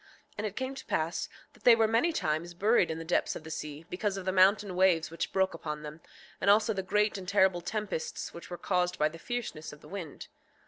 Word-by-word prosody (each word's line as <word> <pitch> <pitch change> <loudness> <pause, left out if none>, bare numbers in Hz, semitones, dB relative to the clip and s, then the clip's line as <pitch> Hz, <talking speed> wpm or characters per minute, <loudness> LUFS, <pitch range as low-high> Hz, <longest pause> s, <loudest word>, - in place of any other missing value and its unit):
6:6 - - -26
And 215 - 0
it 205 - -8
came 260 +1 -3
to 270 - -9
pass 160 +2 -1 0.2
that - - -22
they 240 - +8
were 225 -1 +3
many 230 +10 +2
times 170 - -2
buried 205 0 +3
in 160 - -3
the 165 - -6
depths 175 - +1
of - - -7
the 160 - -8
sea, 155 0 -6
because 195 +2 -2
of 190 - -6
the 190 - +1
mountain 190 +1 +4
waves 180 -4 +3
which 165 - -3
broke 190 0 +2
upon 150 -1 -5
them, 150 +2 -8 0.4
and 200 - +3
also 215 +2 +5
the 190 - -2
great 210 +2 +1
and 185 - -9
terrible 190 -3 +3
tempests 210 -3 -4
which 170 - -10
were 175 - -5
caused 180 -1 0
by 150 0 +3
the 165 +1 -11
fierceness 220 -9 -4
of 150 - -13
the - - -14
wind. 180 -7 -7
185 Hz, 240 wpm, -30 LUFS, 165-210 Hz, 0.4 s, they